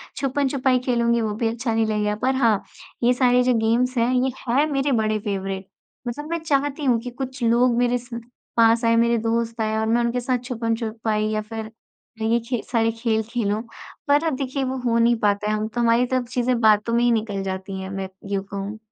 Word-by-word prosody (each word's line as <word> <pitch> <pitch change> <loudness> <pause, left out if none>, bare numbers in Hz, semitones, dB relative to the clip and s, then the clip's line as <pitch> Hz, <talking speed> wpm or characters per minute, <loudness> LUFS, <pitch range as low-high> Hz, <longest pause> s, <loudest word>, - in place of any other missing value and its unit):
छुपन-छुपाई 270 -1 +1
खेलूँगी 235 -1 +2
वो 215 -1 -1
भी 225 +1 0
अच्छा 230 0 -2
नहीं 225 0 +2
लगेगा, 210 -1 0
पर 260 +4 0
हाँ, 230 -6 +2 0.4
ये 245 +1 +5
सारे 250 0 +3
जो 250 0 +3
गेम्स 235 +3 +1
हैं, 235 +2 +2
ये 255 +1 +2 0.2
है 275 +5 +3
मेरे 275 0 0
बड़े 215 -3 +1
फेवरेट। 195 -2 -4 0.4
मतलब 295 +6 -5
मैं 335 - -1
चाहती 290 -1 0
हूँ 245 -3 +3
कि, 245 - -6
कुछ 260 0 -6
लोग 235 +1 +3
मेरे 245 0 +2
स 240 -1 -7 0.4
पास 230 +1 +5
आए 230 0 +4
मेरे 235 0 +3
दोस्त 230 0 -1
आए 215 0 0
और 220 - 0
मैं 235 +2 +2
उनके 235 +1 0
साथ 250 +1 0
छुपन-छुपाई 225 -3 -2
या 215 0 -1
फिर 220 0 -7 0.5
ये 225 +2 +2
खे 245 -4 -1
सारे 225 -1 +2
खेल 225 -2 +1
खेलूँ, 220 -3 -1 0.5
पर 290 +2 +4
अब 305 - 0
देखिए 270 0 -2
वो 260 0 -2
हो 230 -1 +2
नहीं 235 +1 +4
पाता 205 0 +1
है, - - +1
हम 215 0 -2
तो 240 +2 -3
हमारी 235 +1 +3
तरफ 255 0 -1
से - - -19
चीज़ें 245 -1 +1
बातों 215 +1 +4
में 235 +1 +3
ही 240 - +4
निकल 215 -3 -1
जाती 190 0 -5
हैं, 190 - -6
मैं 195 -1 -4 0.2
यूँ 195 -1 0
कहूँ। 200 +2 -6
235 Hz, 215 wpm, -23 LUFS, 220-250 Hz, 0.5 s, ये